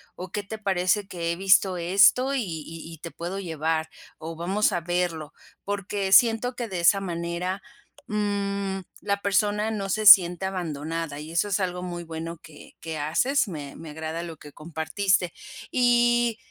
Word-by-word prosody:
o 185 0 -7
qué 205 - -3
te 220 +3 -7
parece 195 0 0
que 170 -3 -3
he - - -2
visto 190 0 +4
esto 195 +10 +4
y 265 - 0
y 165 -2 -7
y - - -10
te 165 +2 -8
puedo 175 +3 -5
llevar, 160 -3 -2 0.3
o 165 +1 -7
vamos 195 +6 +1
a 175 - -1
verlo", 170 -3 -2 0.3
porque 200 -1 -3
siento 230 +4 +5
que 240 - -3
de 185 -4 -4
esa 185 +4 +5
manera, 175 +1 -3 0.5
mm, 200 -2 -2 0.2
la 200 -1 -2
persona 210 +2 +1
no 200 -3 -3
se 215 +2 -1
siente 185 -2 +8
abandonada, 165 -4 -4
y 155 +2 -9
eso 170 +5 +1
es 200 0 0
algo 180 -1 -2
muy 175 -1 -5
bueno 165 0 -6
que 160 -3 -14
que 160 -1 -5
haces, 240 - +1
me 150 -6 -7
me 160 -2 -9
agrada 160 +2 -5
lo 170 -2 -7
que 150 -1 -13
compartiste, 170 +5 -1 0.4
y 240 -2 +3
180 Hz, 170 wpm, -25 LUFS, 165-205 Hz, 0.5 s, siente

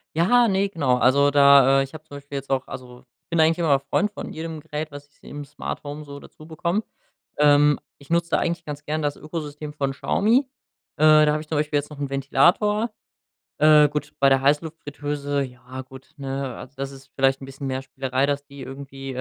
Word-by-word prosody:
Ja, 235 +8 +4
ne, 195 0 +1
genau, 140 -9 +1
also 140 +4 +4
da, 140 -1 +6
äh, - - +2
ich 135 - -10
habe 155 0 -9
zum 145 -3 -10
Beispiel 140 0 -10
jetzt 135 - -7
auch 135 -1 0
also, 125 0 -10 0.2
ich - - -86
bin 170 -1 0
eigentlich 160 +1 +4
immer 145 -5 +3
Freund 205 +9 0
von - - -7
jedem 160 -1 -6
Gerät, 155 0 -5
was 145 0 -10
ich 145 - -35
im 145 0 -8
Smarthome 145 +1 -6
so 140 -1 -9
dazubekomme, 170 +8 -4 0.5
ähm, 145 0 +5 0.2
ich 140 - -18
nutze 170 0 +1
da - - +3
eigentlich 170 0 -2
ganz 145 0 -7
gern 155 +1 -2
das 145 -1 -1
Ökosystem 150 -1 -6
von 140 -2 -1
Xiaomi, 230 - +1 0.5
äh, 155 0 +6
da 150 - +3
habe 150 - -1
ich 155 - -12
zum 155 - -2
Beispiel 150 0 0
jetzt 145 - -7
noch 150 -2 -11
'n 140 - -3
Ventilator. 175 - +2 0.7
Äh, 150 0 +7
gut, 150 +1 -4
bei 135 0 +5
der 135 0 +3
Heißluftfritteuse, 145 -1 -1
ja 130 0 -9
gut, 130 +2 -14
ne, 135 -2 -4
also, 130 - -11
das 135 0 -4
ist 135 -1 -15
vielleicht 135 0 +2
'n - - -7
bisschen 135 +1 -7
mehr 130 0 -2
Spielerei, 135 0 -1
dass 145 0 -2
die 140 -1 -12
irgendwie 135 0 -8
145 Hz, 210 wpm, -23 LUFS, 135-155 Hz, 0.7 s, Äh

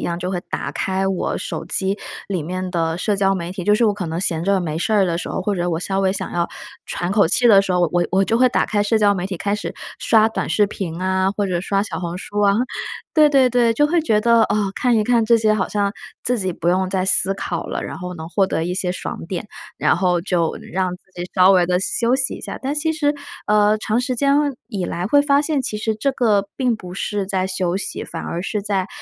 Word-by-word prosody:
样， 170 0 -2
就 180 +1 -3
会 180 - -2
打 - - -3
开 190 0 -1
我 195 -2 -1
手 - - -5
机 190 +1 -1 0.3
里 185 -5 -2
面 185 +3 -4
的 165 -1 0
社 210 +2 0
交 195 -1 +2
媒 175 0 -5
体， 185 -1 -5
就 210 - +3
是 235 - +2
我 210 -2 +3
可 190 -4 -4
能 165 +2 -3
闲 165 -4 -1
着 195 +1 +2
没 160 -3 -3
事 200 +7 -1
儿 205 -2 +4
的 170 - -1
时 175 - -4
候， - - -3
或 200 +2 -1
者 175 -1 -1
我 160 - -1
稍 195 +2 -1
微 190 -1 +2
想 195 - -4
要 170 -1 0 0.4
喘 175 +2 -3
口 200 -5 +4
气 245 +7 +3
的 200 -4 +7
时 190 - -2
候， 180 - +2
我 175 0 +2
我 190 +1 +3
就 225 - +1
会 255 +1 +5
打 - - +1
开 205 -1 +1
社 215 +2 +2
交 205 -1 +4
媒 180 -1 -2
体 190 -2 -4
开 200 +4 -1
始 210 - -4 0.3
刷 220 -1 +4
短 220 - -3
视 210 - +3
频 180 -4 -5
啊， 190 +1 +1
或 205 0 -1
者 180 -2 -1
刷 195 +2 0
小 205 - -5
红 175 0 -4
书 205 +2 -4
啊。 200 -1 +4 0.6
对 305 -2 +6
对 270 -3 +4
对， 235 -2 +3
就 295 +5 +3
会 340 +2 +2
觉 225 -9 +2
得， 230 0 +5
啊， 205 -1 0
看 245 -2 +2
一 215 - +2
看 235 0 +3
这 230 +1 +5
些 215 -1 +2
好 210 -3 0
像 200 -1 0 0.3
自 250 0 +1
己 190 -3 -1
不 170 -1 -6
用 185 +1 +2
再 185 0 0
思 190 +1 +2
考 - - -4
了， - - -3
然 - - -6
后 180 -1 -6
能 160 -2 -7
获 190 +3 +1
得 165 -3 -1
一 175 - -2
些 185 -1 -1
爽 180 - -5
点， 180 +3 -4 0.3
然 - - +2
后 180 -1 +1
就 170 -3 0 0.2
让 185 +1 0
自 - - -35
己 175 - -5
稍 185 0 +6
微 180 -2 +4
地 180 0 +2
休 235 +6 +1
息 265 -1 0
一 - - -9
下。 - - -6
但 275 +2 -1
其 320 +2 0
实， 300 -2 +1 0.3
呃， 210 0 +4
长 215 +2 0
时 250 0 -2
间 275 +3 +2 0.4
以 195 -7 -3
来 175 +1 -3
会 285 +7 +4
发 285 0 +3
现 295 -2 0
其 215 - -3
实 220 +1 -1
这 245 +6 0
个 210 -6 +1
并 250 -3 +1
不 180 -4 -9
是 200 0 -2
在 190 -1 -1
休 185 -1 -1
息， 200 - -4
反 - - -6
而 170 - -4
是 200 +2 -3
在 195 -2 -1
195 Hz, 280 characters per minute, -20 LUFS, 180-220 Hz, 0.6 s, 的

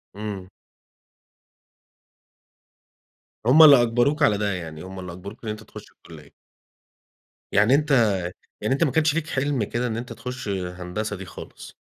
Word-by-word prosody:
إمم. 100 -3 -6 3.0
هُم 150 +6 +7
اللي 140 -5 +9
أجْبَروك 120 +6 +1
على 105 -7 +4
ده، 100 0 -1
يعني 80 -3 -7
هُم 95 0 -9
اللي 90 -1 -7
أجْبَروك 100 +6 -10
إن 110 - -4
أنت 105 +1 -6
تُخش - - -13
الكلية. - - -15 1.2
يعني 105 +6 +4
أنت 135 -8 +3 0.5
يعني 110 +5 0
أنت 155 - +2
ما 150 - +1
كانش 155 +1 +2
لك 165 -1 -1
حِلم 135 -5 -1
كده 120 +4 -2
إن 110 -2 -3
أنت 120 +2 -6
تُخش 125 -3 -7
هندسة 90 +2 -4
دي 95 - -8
خالص؟ - - -11
110 Hz, 145 wpm, -24 LUFS, 95-135 Hz, 3.0 s, اللي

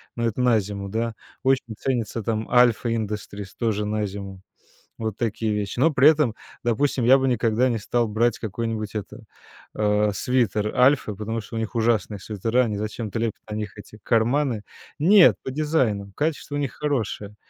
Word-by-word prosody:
но 115 - -1
это 115 +1 -2
на 120 -3 +4
зиму, 100 0 -5
да. 115 +2 -2 0.3
Очень 130 -4 +1
ценится 115 -4 -2
там 110 -1 -2
Alpha 120 -1 +4
Industries, 105 -3 -3
тоже 105 -3 0
на 105 0 -1
зиму. 100 -1 -7 0.6
Вот 110 -2 -4
такие 110 -1 -1
вещи. 105 +2 -3
Но 155 +5 +4
при 135 +1 +5
этом, 145 -8 +2 0.3
допустим, 120 +2 +1
я 130 +3 +7
бы 135 0 0
никогда 120 0 +2
не 115 -3 0
стал 120 +2 0
брать 115 +2 +1
какой-нибудь, 110 0 -4
это, 105 - -6 0.5
а, 105 0 +2
свитер 110 -3 0
"Альфы", 125 -4 +3
потому 110 +2 -3
что 115 +2 -8
у - - -1
них 110 +2 -4
ужасные 110 -3 +1
свитера, 115 +5 0
они 105 -3 -2
зачем-то 110 +1 -4
лепят 115 -2 -2
на - - -3
них 105 -1 -5
эти 110 - -12
карманы? 120 +1 +1 0.4
Нет, 185 +4 +6
по 130 - -4
дизайну. 125 -10 0
Качество 150 -1 -2
у - - 0
них 135 -4 -2
хорошее. 110 -8 -2
115 Hz, 175 wpm, -24 LUFS, 105-125 Hz, 0.6 s, я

